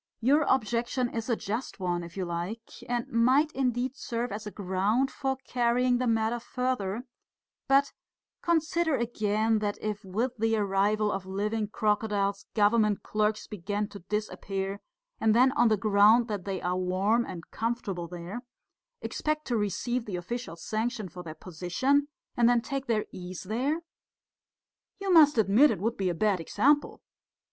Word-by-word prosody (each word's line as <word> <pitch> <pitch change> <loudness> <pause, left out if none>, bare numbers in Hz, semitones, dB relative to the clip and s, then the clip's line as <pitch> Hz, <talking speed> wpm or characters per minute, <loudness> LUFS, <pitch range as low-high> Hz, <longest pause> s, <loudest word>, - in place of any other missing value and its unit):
"Your 275 +6 +4
objection 240 0 +1
is 230 +1 -4
a 235 - +3
just 220 +3 -4
one, 175 -2 -1
if 170 +2 -10
you 185 - -1
like, 175 +7 -5 0.2
and 240 -1 -1
might 260 +7 +3
indeed 255 -1 -1
serve 240 -3 -3
as 210 +1 -5
a - - -5
ground 200 +7 0
for 270 -1 -2
carrying 245 0 +2
the 255 - 0
matter 225 +1 +1
further; 240 -3 -2 0.6
but 275 +1 +4 0.5
consider 330 -1 +1
again, 220 -2 +1
that 205 -1 -2
if 215 0 -4
with 215 +7 -1
the 225 0 +2
arrival 205 +1 +1
of 195 -1 -4
living 210 +3 -1
crocodiles 205 -2 0
government 210 -1 +3
clerks 215 0 0
begin 205 +1 -3
to 205 - -9
disappear, 195 0 -3 0.4
and 220 -1 +3
then 255 +2 +5
on 240 -3 +3
the 215 -1 +3
ground 215 +3 +5
that 205 -5 -4
they 195 -2 -2
are 180 +1 0
warm 190 +6 +1
and 175 -7 -9
comfortable 215 -7 -3
there, 175 +6 -7 0.6
expect 305 0 -2
to 245 - -1
receive 225 +4 -1
the 200 - -4
official 180 +2 -5
sanction 215 +3 -3
for 180 +2 -9
their 160 -3 -8
position, 185 - 0 0.3
and 240 0 +4
then 245 -1 +4
take 275 +4 -4
their 220 -2 +1
ease 180 -1 -7
there... 260 - -1 1.2
you 390 -2 0
must 300 -5 +7
admit 220 +7 +5
it - - -1
would 225 +4 -1
be 190 -2 0
a 175 - -2
bad 205 0 +2
example. 290 - +1
220 Hz, 160 wpm, -28 LUFS, 195-245 Hz, 1.2 s, must